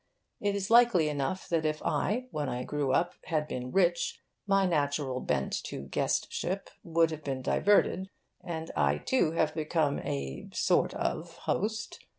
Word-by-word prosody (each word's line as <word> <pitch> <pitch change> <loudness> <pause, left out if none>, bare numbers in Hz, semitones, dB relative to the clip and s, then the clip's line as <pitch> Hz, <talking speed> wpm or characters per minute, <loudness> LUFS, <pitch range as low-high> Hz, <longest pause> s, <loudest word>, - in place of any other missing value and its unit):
It 205 -1 0
is 200 +1 -2
likely 230 -10 +6
enough 145 +5 -2
that 165 -3 +1
if 155 0 0
I, 245 +6 0
when 145 -3 -2
I 125 +1 -3
grew 145 -1 -1
up, 175 +6 +2
had 155 -3 0
been 125 -2 -4
rich, 175 -3 +2 0.3
my 195 -1 +4
natural 145 -5 0
bent 65 - -1
to 65 - -5
guestship 180 - -1
would 165 -1 +2
have 155 -1 -6
been 135 -2 -3
diverted, 195 0 +3 0.3
and 165 -2 -5
I 70 -2 +2
too 165 - +1
have 155 -2 +1
become 155 -2 0
a 70 -1 -4
(sort - - +2
of) - - -3
host. 220 +2 -1
155 Hz, 160 wpm, -30 LUFS, 140-185 Hz, 0.3 s, likely